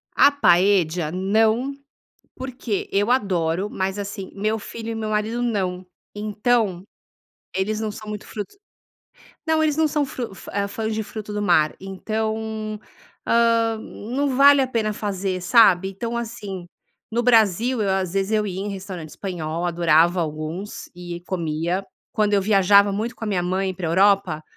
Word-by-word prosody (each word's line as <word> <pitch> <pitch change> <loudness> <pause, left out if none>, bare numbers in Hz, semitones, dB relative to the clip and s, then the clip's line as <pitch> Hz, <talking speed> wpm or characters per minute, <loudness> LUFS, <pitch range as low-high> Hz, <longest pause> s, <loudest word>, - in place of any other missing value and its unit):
A - - +7
Paella 180 - +3
não, 220 +8 +1 0.6
porque 250 -5 -4
eu 205 +3 +1
adoro, 185 -6 +1
mas, 190 +1 -2
assim, 200 -1 -5
meu 215 +2 -1
filho 225 +2 -7
e - - -3
meu 220 -1 -3
marido 215 +3 -1
não. 185 -6 -1 0.3
Então, 210 -2 0 0.7
eles 210 +3 -1
não 220 -1 -2
são 215 +1 -9
muito 210 -1 -6
frutos 215 - -7 0.9
não, 320 0 +3
eles 305 -2 +2
não 315 0 +3
são 295 -1 0
fru 240 -6 -6
fa - - -10
eh, 200 0 0
fãs 220 +2 -3
de 220 - -1
fruto 215 0 -7
do 210 - -2
mar, 165 -6 +3
então, 215 +2 -3 0.5
ah, 230 -1 +3
não 260 +6 -3
vale 280 +1 +7
a 260 - +1
pena 220 -4 -1
fazer, 195 -3 -3
sabe. 190 -2 +5
Então, 230 +5 -4
assim, 210 -6 -6 0.5
no 235 +2 +1
Brasil, 230 +1 +3
eu 200 - 0
às 190 -2 -1
vezes 195 +1 0
eu 215 -1 +2
ia 185 -1 -4
em 205 - -3
restaurante 190 -5 -7
espanhol, 170 -2 -4
adorava 170 0 +3
alguns 155 +5 -5
e 175 -1 -7
comia. 170 +1 -1 0.3
Quando 210 -1 +1
eu 200 - +4
viajava 200 0 +5
muito 220 +5 -3
com - - -9
a - - -3
minha 190 -4 0
mãe 190 +1 -1
pra 175 -2 -4
Europa, 190 -3 +3
205 Hz, 160 wpm, -23 LUFS, 185-225 Hz, 0.9 s, A